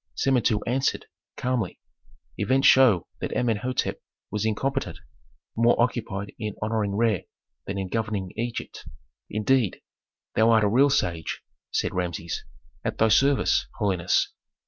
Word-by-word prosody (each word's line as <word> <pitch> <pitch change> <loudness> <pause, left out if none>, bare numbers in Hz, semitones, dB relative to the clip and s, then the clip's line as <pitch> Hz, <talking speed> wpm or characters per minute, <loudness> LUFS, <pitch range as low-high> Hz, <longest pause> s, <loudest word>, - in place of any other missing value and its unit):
Samentu 120 -6 +2
answered, 130 +3 0 0.3
calmly, 125 -7 -2 0.6
"Events 135 +1 +1
show 120 -10 +6
that - - -3
Amenhôtep 125 +1 0 0.3
was 105 +2 -1
incompetent, 130 +6 -1 0.6
more 115 +1 +3
occupied 115 -4 -1
in 105 -2 -4
honoring 105 -2 -1
Re 110 -4 +1 0.4
than 100 - -3
in 95 -1 -2
governing 105 -3 -2
Egypt." 120 0 -4 0.5
"Indeed, 110 0 +1 0.5
thou 110 +1 +4
art 110 -2 +5
a - - +4
real 130 +7 +4
sage!" 85 - -1 0.3
said - - -1
Rameses. 85 -2 -3 0.4
"At - - -2
thy 110 - +4
service, 135 +5 +3
holiness." 95 -5 +1
110 Hz, 125 wpm, -25 LUFS, 100-125 Hz, 0.6 s, show